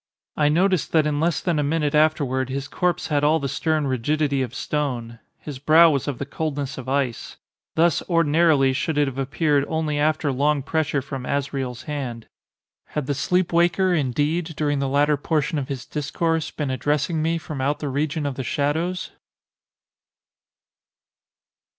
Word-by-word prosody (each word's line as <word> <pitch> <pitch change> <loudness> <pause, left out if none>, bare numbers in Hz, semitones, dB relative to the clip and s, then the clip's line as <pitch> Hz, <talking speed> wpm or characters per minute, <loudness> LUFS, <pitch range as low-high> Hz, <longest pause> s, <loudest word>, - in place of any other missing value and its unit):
I 150 -1 +3
noticed 180 +2 +1
that 160 -2 +4
in 150 -1 0
less 165 -2 +1
than 170 -4 0
a - - +1
minute 150 0 0
afterward 145 -4 +2
his 135 +1 -3
corpse 180 -3 -1
had 145 -2 +1
all 155 +2 +4
the 140 - -2
stern 155 +2 0
rigidity 140 +2 0
of 125 0 -4
stone. 120 -6 -3 0.2
His 145 -4 -8
brow 160 +3 +6
was 140 -2 -1
of 140 -4 -2
the 140 - -4
coldness 145 -2 -4
of 130 - -7
ice. 135 -4 -2 0.4
Thus, 170 +1 +3
ordinarily, 155 -4 +3
should 150 +3 -1
it 145 -1 +3
have 135 0 -5
appeared, 145 +1 +1
only 155 -2 -1
after 150 -1 +1
long 140 +2 +1
pressure 145 -2 -1
from 135 -2 -6
Azrael's 135 -3 -2
hand. 130 -6 -5 0.7
Had 150 - 0
the 145 - -1
sleep 175 +6 0
waker, 175 +2 +3
indeed, 155 +3 0
during 145 -2 0
the 135 -1 -1
latter 145 +2 +3
portion 155 +2 0
of 135 - -4
his 135 -4 -5
discourse, 160 +2 -1
been 145 -4 -3
addressing 150 +4 0
me 165 +2 +1
from 150 -4 -6
out 145 +2 0
the 150 - -4
region 145 +2 -1
of 140 - -1
the 130 - -5
shadows? 165 +7 -1
145 Hz, 170 wpm, -23 LUFS, 135-160 Hz, 0.7 s, brow